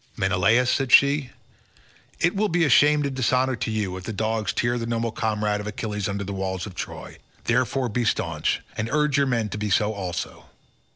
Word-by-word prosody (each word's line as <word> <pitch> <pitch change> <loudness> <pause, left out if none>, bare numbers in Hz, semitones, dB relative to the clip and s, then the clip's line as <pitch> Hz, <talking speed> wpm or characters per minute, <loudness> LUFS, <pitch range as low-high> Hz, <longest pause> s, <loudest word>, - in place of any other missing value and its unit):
"Menelaus," 100 +7 +3
said 135 -3 0
she, 140 0 +5 0.9
"it 175 +3 +2
will 210 +1 +1
be 170 -1 +2
shame 150 +3 +5
and 140 -1 -2
dishonour 130 0 +1
to - - -3
you, 105 -4 -2
if 95 - -9
dogs 110 0 -1
tear 120 +1 0
the 115 - -4
noble 115 0 -1
comrade 105 -2 -1
of 105 - -7
Achilles 105 -2 -3
under 100 0 -3
the 100 +1 -5
walls 95 -1 -3
of 100 - -9
Troy. - - -7 0.2
Therefore 125 +2 +1
be 120 +2 -1
staunch, - - -1
and 110 +1 -3
urge 150 -1 +2
your 140 - +2
men 115 -4 0
to 105 - -5
be 105 0 -2
so 105 +2 +2
also." 95 -4 -5
115 Hz, 190 wpm, -24 LUFS, 105-130 Hz, 0.9 s, she